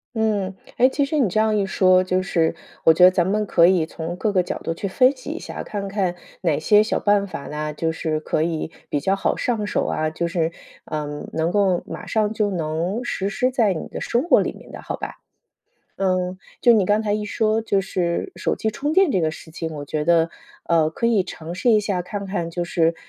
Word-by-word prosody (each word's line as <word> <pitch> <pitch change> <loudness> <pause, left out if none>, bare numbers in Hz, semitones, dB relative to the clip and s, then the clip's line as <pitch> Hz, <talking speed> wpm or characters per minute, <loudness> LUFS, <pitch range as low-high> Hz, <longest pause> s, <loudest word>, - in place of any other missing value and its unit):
嗯， 205 -4 0 0.2
诶， 255 +2 +5
其 285 +1 0
实 300 +2 -1
你 235 -9 +3
这 215 - 0
样 220 -1 +2
一 205 - +2
说， 185 -1 +4
就 185 0 0
是 165 -4 +1 0.3
我 - - +7
觉 170 +3 +4
得 185 - +9
咱 180 -1 +1
们 210 +2 +1
可 170 -3 +5
以 180 -4 +3
从 165 +2 -6
各 210 +2 -1
个 185 - +3
角 180 - -4
度 165 - -1
去 200 +4 -4
分 255 +7 +4
析 255 - -9
一 335 - -4
下， - - -7
看 200 -2 -5
看 190 -3 -1 0.3
哪 155 -5 +1
些 210 +6 +5
小 215 - 0
办 205 -1 +2
法 165 - -6
呐， 150 0 -4
就 160 +2 -1
是 160 -1 -2
可 155 - -1
以 160 0 -2 0.2
比 145 - 0
较 190 +7 +1
好 - - 0
上 220 -4 -1
手 - - 0
啊， 155 0 -1
就 170 +2 -2
是， 165 -2 0 0.3
嗯， 150 -1 -5
能 160 +2 0
够 190 -3 +2
马 - - -8
上 215 -1 +1
就 210 -1 0
能 175 +5 -2
实 195 -4 -2
施 250 +4 0
在 225 -7 +2
你 160 - -5
的 - - -7
生 240 +4 0
活 345 - +5
里 - - -1
面 - - -14
的 - - -8
好 - - -5
吧。 - - -6 0.9
嗯， 185 -1 0 0.2
就 240 - +6
你 210 -4 +4
刚 205 +3 +2
才 210 -2 -1
一 210 0 -1
说， 220 0 +1
就 200 -3 +1
是 180 - -2
手 - - -1
机 220 - -1
充 290 +7 -2
电 375 -6 +4
这 185 - +2
个 160 -1 +1
事 160 - -11
情， 165 0 -4
我 145 -1 -6
觉 150 +1 -2
得， 165 -1 +3 0.3
呃， 165 -2 +3
可 230 - -1
以 220 -4 +3
尝 170 -1 -8
试 235 +6 +2
一 215 - +6
下 200 -3 -1
看 200 +1 -5
看 175 -4 -3
就 175 +1 -2
是， 170 -1 +1
185 Hz, 255 characters per minute, -22 LUFS, 165-215 Hz, 0.9 s, 得